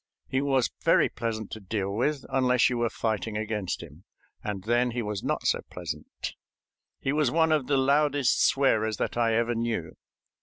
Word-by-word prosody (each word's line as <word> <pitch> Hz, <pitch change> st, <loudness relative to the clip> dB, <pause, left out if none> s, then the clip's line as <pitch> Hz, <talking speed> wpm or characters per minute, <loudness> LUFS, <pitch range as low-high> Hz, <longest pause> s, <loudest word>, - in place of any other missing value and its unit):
He 130 Hz, -, 0 dB
was 135 Hz, -3 st, +1 dB
very -, -, +4 dB
pleasant 110 Hz, -3 st, -4 dB
to 110 Hz, -, -6 dB
deal 100 Hz, -1 st, -3 dB
with, 135 Hz, +6 st, 0 dB
unless 125 Hz, -1 st, +3 dB
you 120 Hz, -, -1 dB
were 120 Hz, -1 st, +1 dB
fighting 110 Hz, -1 st, -2 dB
against 105 Hz, -5 st, -3 dB
him, 80 Hz, +2 st, -14 dB, 0.4 s
and 100 Hz, -3 st, -4 dB
then 120 Hz, +3 st, +2 dB
he 120 Hz, 0 st, -2 dB
was 105 Hz, -2 st, -3 dB
not -, -, -2 dB
so -, -, +2 dB
pleasant. -, -, -6 dB, 0.7 s
He 135 Hz, -, -1 dB
was 150 Hz, -4 st, +2 dB
one 160 Hz, +3 st, +3 dB
of 150 Hz, -5 st, +2 dB
the 140 Hz, -, +2 dB
loudest 140 Hz, 0 st, +3 dB
swearers 110 Hz, -6 st, +2 dB
that -, -, -2 dB
I 115 Hz, -2 st, +2 dB
ever 115 Hz, +1 st, +1 dB
knew. 115 Hz, -7 st, -2 dB
120 Hz, 180 wpm, -27 LUFS, 110-135 Hz, 0.7 s, very